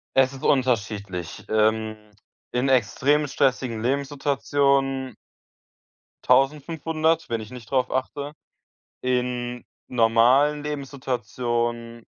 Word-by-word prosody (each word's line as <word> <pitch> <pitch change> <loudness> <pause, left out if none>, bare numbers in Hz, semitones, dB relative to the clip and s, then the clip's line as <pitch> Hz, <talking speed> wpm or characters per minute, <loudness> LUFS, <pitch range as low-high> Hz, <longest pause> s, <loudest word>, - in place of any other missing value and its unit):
Es 135 0 +4
ist 135 - -10
unterschiedlich. 105 - -1
Ähm, 110 0 +1 0.6
in 125 +2 0
extrem 135 +4 +2
stressigen 130 -4 0
Lebenssituationen 140 0 0 1.1
1.500 155 +4 +1
wenn 115 -1 -1
ich 110 - -10
nicht 125 -2 -11
darauf 130 -1 +1
achte. 140 +3 -3 0.7
In 125 -1 -1 0.2
normalen 125 +5 +4
Lebenssituationen 120 -4 -3
130 Hz, 85 wpm, -24 LUFS, 115-140 Hz, 1.1 s, Es